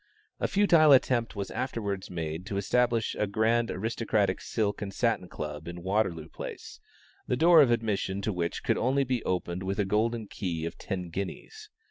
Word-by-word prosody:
A - - +1
futile 170 -7 +5
attempt 125 -3 +2
was 100 -1 -4
afterwards 100 -7 -3
made 85 +1 -4
to 100 - -3
establish 115 +3 +1
a 105 - +1
grand 110 +3 +1
aristocratic 105 -2 0
silk 105 -3 -1
and 100 -2 -4
satin 110 -3 0
club 75 -1 -6
in 85 0 -7
Waterloo 95 -5 0
Place, - - -8 0.5
the 125 - 0
door 165 +1 +7
of 135 - +5
admission 105 -4 0
to 110 - -1
which 85 -1 -3
could - - +1
only 135 +3 +2
be 125 -3 -1
opened 90 0 -2
with 95 +1 -2
a 105 - +1
golden 110 +3 0
key 85 -5 -4
of 85 - -5
ten 90 -4 -5
guineas. 425 - -6
105 Hz, 175 wpm, -28 LUFS, 95-120 Hz, 0.5 s, door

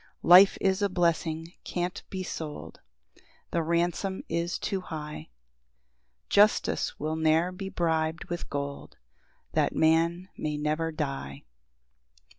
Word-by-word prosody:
4 - - -3
[Life 190 +2 +9
is 190 +1 +1
a 200 - +2
blessing 170 -2 0
can't 175 0 -3
be 185 -1 -4
sold, 155 -4 -7 0.7
The 170 - +1
ransom 175 +3 -1
is 170 +1 -1
too 195 -3 -2
high; 150 - -7 1.0
Justice 210 +1 +3
will 155 +1 -2
ne'er 160 +2 +2
be 190 +1 -6
brib'd 160 -2 0
with 175 0 -5
gold 140 0 -5 0.5
That - - +1
man 165 +3 +2
may 150 -1 -3
never 155 +2 -1
die. 70 - -4
165 Hz, 120 wpm, -28 LUFS, 155-180 Hz, 1.0 s, Life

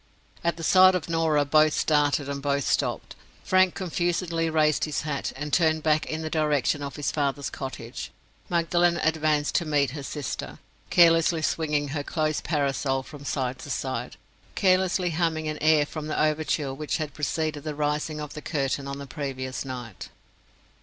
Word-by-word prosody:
At 170 -1 0
the 165 - -7
sight 185 +2 +6
of 170 -2 -3
Norah 160 -3 +2
both 155 +1 +4
started, 145 -2 +2
and 140 0 -4
both 140 0 0
stopped. - - -1 0.3
Frank 185 -1 +3
confusedly 175 -2 -1
raised 155 -1 +2
his 155 - -2
hat, 150 -2 -2
and 150 +2 -6
turned 160 -2 +3
back 155 0 +2
in 160 +1 -3
the - - -3
direction 150 -2 +1
of 140 -1 -5
his 145 - -2
father's 140 -1 -1
cottage. 130 -3 -6 0.4
Magdalen 175 0 +2
advanced 155 -2 +1
to 170 - -1
meet 145 -4 +1
her 145 +1 -6
sister, 140 -1 -5 0.3
carelessly 165 -1 +5
swinging 150 -3 0
her 145 +1 -2
closed 155 +1 -1
parasol 135 -3 0
from 145 +1 -11
side 130 -2 -2
to 145 - -9
side, 130 -3 -3 0.4
carelessly 185 -2 +2
humming 160 -1 0
an 155 0 -3
air 155 -1 +4
from 155 0 -6
the 155 - -2
overture 155 -2 0
which 150 +2 -2
had 155 -3 -4
preceded 155 +1 -2
the 155 -1 -4
rising 150 +1 -1
of 150 -1 -6
the 150 - -7
curtain 140 -3 -2
on 140 0 -4
the 140 - -7
previous 130 -2 -4
night. 125 -6 -7
150 Hz, 170 wpm, -26 LUFS, 140-160 Hz, 0.4 s, sight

